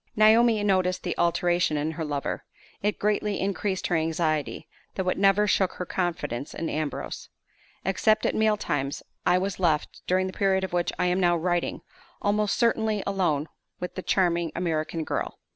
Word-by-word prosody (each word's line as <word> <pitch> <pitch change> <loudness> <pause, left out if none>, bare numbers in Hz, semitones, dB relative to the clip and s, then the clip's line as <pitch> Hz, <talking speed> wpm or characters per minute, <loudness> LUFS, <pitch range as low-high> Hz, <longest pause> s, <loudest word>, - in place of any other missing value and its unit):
Naomi 220 0 +5
noticed 185 -2 +1
the 175 - -2
alteration 175 -2 +2
in 150 +2 -1
her 160 0 -4
lover. 145 -2 -3 0.4
It 210 +1 0
greatly 210 0 0
increased 195 0 -1
her 175 - +1
anxiety, 160 -2 -1 0.3
though 190 -1 -2
it - - -1
never 195 +1 +4
shook 190 -2 +2
her 180 - -5
confidence 155 -8 -3
in 165 - -3
Ambrose. 155 -1 -4 0.6
Except 215 +3 +2
at - - +2
meal 220 -1 +2
times, 140 -7 -2 0.2
I 180 - +5
was 190 +1 -2
left, 160 -5 0
during 185 +1 +2
the 185 - -4
period 190 -1 +1
of 190 - -4
which 175 -1 +1
I 180 - +1
am 180 +1 +2
now 175 -2 +3
writing, 175 +1 -1 0.4
almost 210 0 +1
constantly 220 -3 +2
alone 175 -7 0 0.3
with 180 - -4
the 185 - -5
charming 175 -3 +1
American 165 -1 -1
girl. - - -3
180 Hz, 170 wpm, -26 LUFS, 165-200 Hz, 0.6 s, Naomi